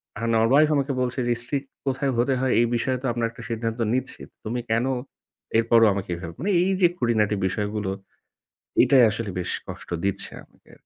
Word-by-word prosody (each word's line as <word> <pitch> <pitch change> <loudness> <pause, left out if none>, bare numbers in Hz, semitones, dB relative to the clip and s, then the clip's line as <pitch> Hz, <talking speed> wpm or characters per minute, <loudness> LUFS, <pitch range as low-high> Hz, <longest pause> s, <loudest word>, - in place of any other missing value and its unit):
আর 105 - -7 0.2
আমার 115 - +4
wife 150 +2 +5
আমাকে 140 0 0
বলছে 125 +1 -1
যে, 120 - +3
"strict 140 +1 -3 0.2
কোথায় 135 0 0
হতে 125 +3 +2
হয় 130 -1 +1
এই 120 - +5
বিষয়ে 130 +2 0
তো 135 - -6
আমরা 115 0 -1
একটা 115 - -12
সিদ্ধান্ত 115 0 -3
নিচ্ছি, 130 +1 -3 0.2
তুমি 120 +3 -3
কেন 115 +2 +2 0.7
এরপরও 115 0 +5
আমাকে 95 -2 -5
এভাবে?" 85 -1 -7
মানে 200 +5 0
এই 190 - +2
যে 175 - +7
খুটিনাটি 110 - +1
বিষয়গুলো, 105 +1 -2 0.9
এটাই 130 +1 +6
আসলে 110 -1 -4
বেশ 90 - -3 0.2
কষ্ট - - -9 0.2
দিচ্ছে 100 - -2
আমাকে। - - -24
120 Hz, 180 wpm, -24 LUFS, 110-130 Hz, 0.9 s, যে